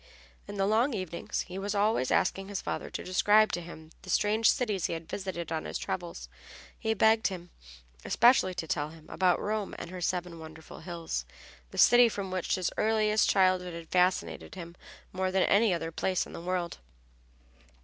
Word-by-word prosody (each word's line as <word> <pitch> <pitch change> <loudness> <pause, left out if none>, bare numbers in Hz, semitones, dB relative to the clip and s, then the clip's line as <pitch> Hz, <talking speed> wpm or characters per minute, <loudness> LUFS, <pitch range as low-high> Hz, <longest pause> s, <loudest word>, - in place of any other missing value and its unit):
In 205 - -7
the 195 - +2
long 225 +5 +2
evenings 185 -4 -3
he 185 +1 -7
was 205 +1 -3
always 205 - +2
asking 195 0 +1
his 200 -1 -3
father - - -4
to - - -6
describe 210 +4 +4
to 175 - -2
him 160 -2 -11
the 185 - -12
strange 215 +4 +3
cities 210 -8 0
he - - -3
had 165 -1 -6
visited 175 -4 -5
on 160 -1 -2
his - - -3
travels. 170 - -5 0.5
He 220 0 0
begged 220 +2 +4
him 180 -3 -7 0.5
especially 235 -6 +4
to 165 - -3
tell 150 0 -1
him 160 0 -15
about 185 -2 +2
Rome 210 -1 -3
and 170 - -7
her 185 -1 -7
seven 175 -1 -2
wonderful 160 0 -11
hills, 170 - -4 0.5
the - - -11
city 245 0 +7
which 230 - 0
from 195 -2 -4
his 185 0 -1
earliest 215 -1 +2
childhood 185 -2 +2
had 165 -1 -9
fascinated 180 +1 0
him 170 -2 -9 0.4
more 185 0 -1
than 190 0 +3
any 210 +1 +4
other 165 -2 -2
place 185 +2 -1
in - - -12
the - - -7
world. 180 -1 -3
185 Hz, 185 wpm, -29 LUFS, 170-205 Hz, 0.5 s, city